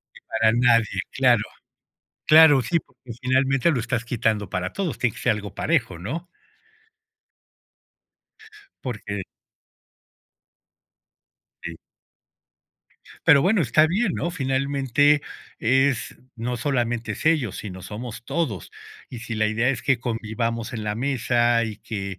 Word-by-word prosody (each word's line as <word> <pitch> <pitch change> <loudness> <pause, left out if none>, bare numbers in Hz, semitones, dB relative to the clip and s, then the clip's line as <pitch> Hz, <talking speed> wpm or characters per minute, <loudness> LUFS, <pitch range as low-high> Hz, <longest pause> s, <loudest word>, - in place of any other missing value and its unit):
Ni - - -14
para 110 0 +2
nadie, 115 -2 +3
claro. - - +3 0.8
Claro, 155 -4 +7
sí, 170 +6 +1
porque 125 -2 -13
finalmente 135 +4 +2
lo 135 -6 0
estás 115 0 -2
quitando 110 -4 -1
para 90 +1 -3
todos, 185 -7 -3
tiene 120 -4 0
que - - -10
ser - - +3
algo 105 -2 -6
parejo, 115 - 0
¿no? 150 - -5 2.6
Porque 105 -5 -4 2.4
Sí. 85 -1 -6 1.5
Pero, 140 -1 +7
bueno, 195 +3 +3
está 155 +2 +4
bien, 195 +4 0
¿no? 170 - -2
Finalmente, 140 -1 +1 0.4
es 135 +1 +1 0.2
no 120 +2 -3
solamente 120 -3 -1
es - - -6
ellos, 145 - +2
sino 95 -3 -8
somos 115 +4 -7
todos, 120 - -3 0.4
y 125 - -7
si 115 0 -6
la 110 0 +1
idea 110 +3 +1
es 125 -3 -1
que 135 -3 +1
convivamos 115 0 -3
en 110 -3 -5
la 105 - -2
mesa, 120 -2 +1
y 110 -2 -5
que 100 -4 -6
120 Hz, 125 wpm, -23 LUFS, 110-135 Hz, 2.6 s, Claro